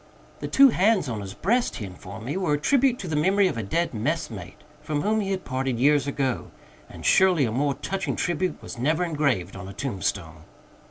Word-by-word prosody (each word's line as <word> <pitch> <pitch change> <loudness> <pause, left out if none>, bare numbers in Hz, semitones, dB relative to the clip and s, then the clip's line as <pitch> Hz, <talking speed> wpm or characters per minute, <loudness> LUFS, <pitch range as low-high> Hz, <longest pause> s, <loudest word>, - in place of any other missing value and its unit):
The - - -4
two 275 0 +7
bands 205 -5 +2
on 110 -4 -3
his 95 0 -8
breast, 235 - +1
he 105 - -5
informed 95 +3 -10
me, 140 - -3
were 185 -6 0
a - - +2
tribute 265 - +3
to 185 - -6
the 160 - -2
memory 190 +6 +3
of - - -2
a 115 - -2
dead 165 - -1
messmate 110 - -4 0.2
from 150 -1 -2
whom 220 +1 +1
he 195 - -3
had 190 -1 -3
parted 130 -1 -2
years 145 +1 +3
ago 135 -3 -2 0.4
and - - -10
surely 185 -7 +4
a 115 - -2
more 140 +4 0
touching 190 -8 -3
tribute 175 -1 -1
was - - -8
never 155 +7 +1
engraved 140 - 0
on 95 -1 -8
a - - -8
tombstone. 95 - -4
145 Hz, 210 wpm, -25 LUFS, 115-185 Hz, 0.4 s, two